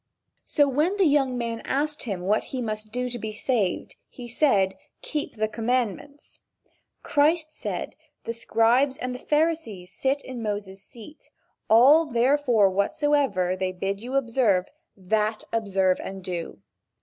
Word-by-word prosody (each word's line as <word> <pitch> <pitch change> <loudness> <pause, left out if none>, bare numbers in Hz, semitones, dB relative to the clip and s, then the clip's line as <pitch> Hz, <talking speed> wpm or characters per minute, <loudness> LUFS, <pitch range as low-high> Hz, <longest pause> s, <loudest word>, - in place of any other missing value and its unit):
So, 290 -1 +3
when 305 +9 +1
the 390 - +4
young 275 -4 +2
man 230 -1 -3
asked 295 +2 -2
him 195 -6 -3
what 205 +4 +1
he 260 - -5
must 215 -2 -4
do 250 +2 -2
to 240 -1 -5
be 220 0 -4
saved, 210 -4 -1
he 245 -2 -10
said: 215 -7 +2 0.3
"Keep 300 -5 -4
the 215 0 0
commandments." 245 +5 -3 0.6
Christ 310 +2 +2
said: - - -5 0.3
"The 230 - -4
scribes 235 +4 +2
and 250 0 -4
the 250 - -7
Pharisees 295 - -1
sit 275 +6 -1
in 255 -2 -7
Moses' 205 -3 -4
seat, 240 +8 -14 0.4
all 280 +9 +6
therefore 245 -3 +3
whatsoever 200 -3 +1
they 185 0 -2
bid 195 +2 -3
you 250 +3 -5
observe, 230 -8 +2 0.3
that 215 +3 -1
observe 195 -4 +1
and 190 -1 -7
do." 175 -2 -5
235 Hz, 145 wpm, -25 LUFS, 205-275 Hz, 0.6 s, all